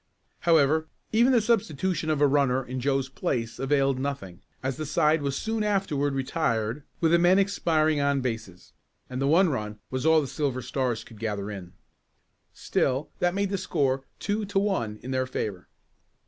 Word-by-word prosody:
However, 160 0 +4 0.2
even 235 +4 +4
the 240 -3 +4
substitution 190 - 0
of 150 -2 +1
a - - +7
runner 135 -2 +2
in 130 +1 -4
Joe's 135 0 0
place 115 -3 -3
availed 135 -1 +1
nothing, 130 -11 -4 0.2
as 135 0 -2
the 155 - -3
side 150 +1 +2
was 140 -1 -1
soon 225 -1 -1
afterward 165 -9 0
retired 130 -3 -1 0.2
with 165 -1 +2
the 170 - +5
men 175 +2 +5
expiring 160 -6 +2
on 140 -1 +2
bases, 115 -8 -5 0.4
and 130 +1 -3
the 135 - +2
one 170 +5 +5
run 105 -6 -3
was 130 0 -2
all 160 0 +5
the 150 - -1
Silver 135 -2 -2
Stars 125 -3 -1
could 110 -3 -15
gather 105 -2 -3
in. 90 -3 -8 0.8
Still 135 +3 -1
that 175 +1 +1
made 200 0 0
the 195 - -1
score 140 -7 0
two 210 +1 -2
to 200 0 -3
one 190 - 0
in 130 - -5
their 130 0 0
favor. 100 -7 -4
140 Hz, 175 wpm, -26 LUFS, 125-165 Hz, 0.8 s, a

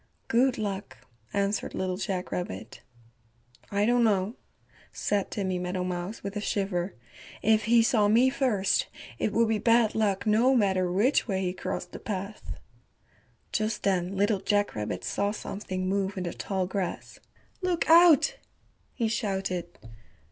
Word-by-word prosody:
"Good 250 +2 +3
luck," 195 -10 -4 0.3
answered 200 0 -1
Little 185 -1 -2
Jack 190 -2 -3
Rabbit. 95 - -5 0.9
"I 205 0 +1
don't 240 +1 +3
know," 205 -1 +2 0.6
said 205 -2 -1
Timmy 190 -3 -2
Meadowmouse 180 +2 -3
with 200 +1 -5
a 210 - -2
shiver, 195 -3 -2 0.5
"if 220 -1 +3
he 230 +1 +5
saw 220 -3 +3
me 240 +5 +4
first, 235 -8 +1 0.3
it - - 0
would 230 +1 +3
be 220 -1 +1
bad 230 0 +3
luck 205 -3 0
no 230 +5 +4
matter 190 -5 +2
which 225 +11 +2
way 190 -3 -1
he 180 -1 -1
crossed 185 0 -5
the - - -8
path." 200 0 -5 1.0
Just 215 0 -1
then 190 -1 0
Little 205 0 +2
Jack 205 +1 +1
Rabbit 105 -1 -4
saw 200 0 0
something 190 -3 -4
move 195 0 -1
in 185 - -2
the 175 - -4
tall 190 -2 -2
grass. 185 -1 -4 0.4
"Look 360 -2 0
out," 345 - +6 0.6
he 230 - 0
shouted. 190 -5 -2
200 Hz, 145 wpm, -28 LUFS, 185-220 Hz, 1.0 s, out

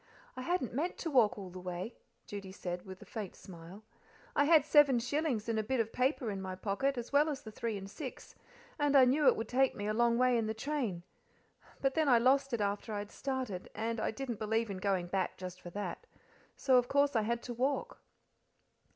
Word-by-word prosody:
"I 255 - -5
hadn't 305 -4 -1
meant 320 +8 -1
to 330 - -3
walk 235 -7 +4
all 190 -3 -7
the 185 - -8
way," 180 +5 -5 0.3
Judy 200 -2 -7
said, 180 -1 -5
with 190 0 -9
a - - -16
faint 210 -5 -7
mile. 180 +3 -11 0.5
"I 285 - +4
had 310 -2 +6
seven 295 -4 +6
shillings 255 -2 -1
in 225 -1 0
a - - 0
bit 260 +4 -1
of 225 -1 -1
paper 255 -3 +1
in 195 -1 -4
my 185 -1 -4
pocket, 225 +8 -1
as 240 +3 -5
well 295 +2 +5
as 280 -3 -4
the 220 - -8
three 220 0 -3
and 195 0 -7
six, 260 +5 -8 0.5
and 290 -1 +2
I 260 - +8
knew 280 +4 +3
it - - +7
would 225 - -4
take 265 +1 +2
me 205 - -4
a 215 - 0
long 235 +1 +3
way 250 -1 +4
in 220 - -1
the 220 - -2
train. 225 - -2 0.8
But 270 0 +2
then 310 -1 +2
I 245 - +7
lost 270 +3 +3
it 235 -3 -1
after 205 +2 -2
I - - -2
had 205 +1 -5
started, 260 -9 -4
and 225 +1 -2
I - - 0
didn't 245 -2 -4
believe 220 0 0
in 195 - -4
going 185 -2 0
back 185 +1 -2
just 185 0 -7
for 175 - -8
that, 205 - -5 0.5
so, 260 -2 +4
of 245 0 +3
course, 280 0 +2
I 225 - +4
had 235 +2 -1
to 245 - -5
walk." 275 - -1
230 Hz, 230 wpm, -33 LUFS, 200-270 Hz, 0.8 s, I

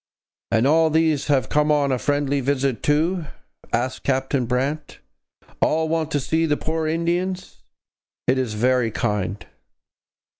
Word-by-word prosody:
'And 115 +2 +3
all 160 +3 +4
these 160 -2 +1
have 140 -3 +2
come 150 0 +2
on 145 -2 +2
a 130 - 0
friendly 145 +2 0
visit 135 -3 0
too?' 160 +4 +1 0.5
asked 130 +2 -1
Captain 135 -1 0
Brant. 135 +5 -2 0.6
'All 160 +1 +2
want 160 -1 0
to 145 - 0
see 160 +4 0
the 150 -1 +1
poor 160 0 -2
Indians; 170 - -2 0.6
it 130 +1 +2
is 120 -5 -2
very 125 +1 +2
kind.' 105 -2 -2
145 Hz, 140 wpm, -22 LUFS, 130-160 Hz, 0.6 s, all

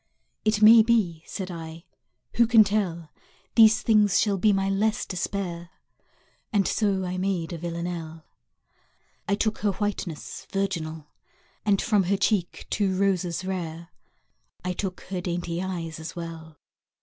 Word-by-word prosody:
It 215 0 +1
may 225 +1 +10
be, 215 -8 +1
said 190 -2 -5
I, 165 -1 -8 0.5
who 235 -1 +5
can 225 -2 +7
tell, 185 -6 -2 0.4
These 220 -2 +6
things 210 -3 +4
shall 200 -3 +1
be 210 +3 +4
my 195 -1 +1
less 210 +2 0
despair? 180 -2 -4 0.8
And 200 -3 +2
so 195 -3 0
I 180 0 -3
made 185 -3 -1
a 170 - -5
Villanelle! 170 -1 -5 1.0
I 200 - +2
took 220 +1 -1
her 205 -1 +1
whiteness 195 -6 -4
virginal 165 -6 -2 0.6
And 200 -1 +4
from 210 -5 +2
her 195 +2 +1
cheek 195 -3 0
two 195 -3 +1
roses 185 -3 0
rare: 170 -3 -4 0.8
I 180 - -1
took 185 0 -4
her 185 -2 -2
dainty 175 -1 -3
eyes 170 -4 -4
as 160 +2 -7
well. 165 -2 -8
185 Hz, 140 wpm, -26 LUFS, 170-205 Hz, 1.0 s, may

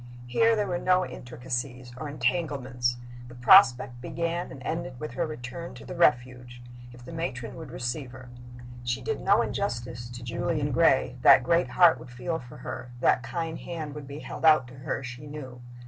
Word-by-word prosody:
Here 225 - +3
there 210 -1 0
were 175 -2 -2
no 185 0 +3
intricacies 125 0 -5
or 145 +3 -6
entanglements. 125 -3 -1 0.3
The 120 - -12
prospect 125 -4 +6
began 170 +4 -3
and 130 - -9
ended 130 -5 -4
with 155 - -5
her 170 -2 -2
return 155 +3 -7
to - - -11
the - - -7
Refuge, 125 -6 +1 0.3
if 120 0 -14
the - - -9
matron 130 -8 -4
would 160 -4 -8
receive 125 +2 -4
her. 130 -1 -11 0.5
She 120 0 -1
did - - -2
no - - +4
injustice 120 0 -3
to 120 0 -9
Julian 145 +4 -1
Gray; 135 -4 +3
that 130 - +8
great 170 +7 +2
heart 175 -3 +5
would 125 - -11
feel 160 +7 -3
for 125 0 -12
her, 125 - -7
that 125 - +3
kind 160 +6 -4
hand 160 -4 -6
would 150 -2 -8
be 140 +2 -8
held - - -8
out 155 -5 +6
to - - -13
her, 135 - -3
she 125 +3 -8
knew. 130 -4 -8
130 Hz, 185 wpm, -27 LUFS, 125-165 Hz, 0.5 s, that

